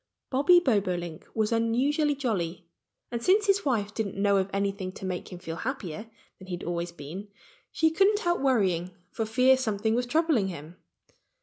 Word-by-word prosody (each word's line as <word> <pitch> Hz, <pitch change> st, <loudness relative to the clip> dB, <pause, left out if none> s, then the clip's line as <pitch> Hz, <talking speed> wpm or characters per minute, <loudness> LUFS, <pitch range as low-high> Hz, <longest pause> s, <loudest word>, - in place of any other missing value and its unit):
Bobby 290 Hz, +7 st, +6 dB
Bobolink 185 Hz, -, -1 dB
was 220 Hz, -1 st, +1 dB
unusually 265 Hz, +7 st, +1 dB
jolly. 185 Hz, -10 st, -2 dB, 0.5 s
And 235 Hz, -1 st, -3 dB
since 405 Hz, +3 st, +4 dB
his 400 Hz, 0 st, +3 dB
wife 215 Hz, -7 st, 0 dB
didn't 205 Hz, -4 st, -3 dB
know 200 Hz, 0 st, +3 dB
of 190 Hz, 0 st, 0 dB
anything 195 Hz, -1 st, -2 dB
to 190 Hz, -, -8 dB
make 185 Hz, 0 st, -4 dB
him 180 Hz, -, -7 dB
feel 165 Hz, -2 st, -6 dB
happier 215 Hz, -, -5 dB, 0.3 s
than 190 Hz, -, -12 dB
he 180 Hz, -, -3 dB
had 175 Hz, -, -9 dB
always 170 Hz, 0 st, -3 dB
been, 170 Hz, +6 st, -8 dB, 0.4 s
she 320 Hz, 0 st, +2 dB
couldn't 395 Hz, +5 st, +4 dB
help 345 Hz, -5 st, 0 dB
worrying 185 Hz, -9 st, +1 dB, 0.2 s
for 225 Hz, -, -3 dB
fear 255 Hz, +4 st, +5 dB
something 220 Hz, -3 st, -1 dB
was 245 Hz, +1 st, 0 dB
troubling 310 Hz, -7 st, +2 dB
him. 170 Hz, -1 st, -8 dB
215 Hz, 175 wpm, -27 LUFS, 185-265 Hz, 0.5 s, Bobby